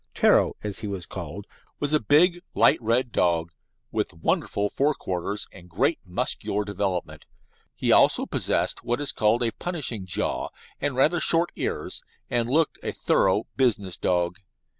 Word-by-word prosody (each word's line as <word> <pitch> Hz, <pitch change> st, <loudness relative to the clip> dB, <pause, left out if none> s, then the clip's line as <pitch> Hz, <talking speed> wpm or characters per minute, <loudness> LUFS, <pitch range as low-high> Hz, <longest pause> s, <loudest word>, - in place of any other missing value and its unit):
"Ptero," -, -, +4 dB
as 105 Hz, -1 st, -4 dB
he 110 Hz, -, -5 dB
was 95 Hz, -3 st, -5 dB
called, 90 Hz, +2 st, -7 dB, 0.3 s
was 145 Hz, +1 st, -1 dB
a 150 Hz, -, +5 dB
big, 170 Hz, -, +4 dB
light -, -, +4 dB
red 120 Hz, +2 st, +1 dB
dog, 85 Hz, -4 st, +1 dB, 0.4 s
with -, -, -2 dB
wonderful 100 Hz, +5 st, 0 dB
fore 145 Hz, +2 st, +1 dB
quarters 95 Hz, +3 st, -4 dB
and 90 Hz, -2 st, -13 dB
great 80 Hz, -, +1 dB
muscular 105 Hz, +1 st, -2 dB
development. 90 Hz, -6 st, -3 dB, 0.5 s
He -, -, 0 dB
also -, -, +5 dB
possessed -, -, -1 dB
what 120 Hz, +2 st, -1 dB
is 145 Hz, -, -1 dB
called 110 Hz, +3 st, +2 dB
a 115 Hz, -, +1 dB
"punishing 135 Hz, -, -3 dB
jaw" 85 Hz, -, -1 dB, 0.3 s
and 140 Hz, -2 st, -1 dB
rather 155 Hz, +7 st, +3 dB
short 165 Hz, +1 st, +3 dB
ears, -, -, -4 dB, 0.3 s
and 120 Hz, -1 st, +1 dB
looked 160 Hz, +4 st, +1 dB
a -, -, -3 dB
thorough 95 Hz, +3 st, +2 dB
"business" 105 Hz, -8 st, +1 dB
dog. 90 Hz, +1 st, 0 dB
105 Hz, 155 wpm, -25 LUFS, 95-140 Hz, 0.5 s, a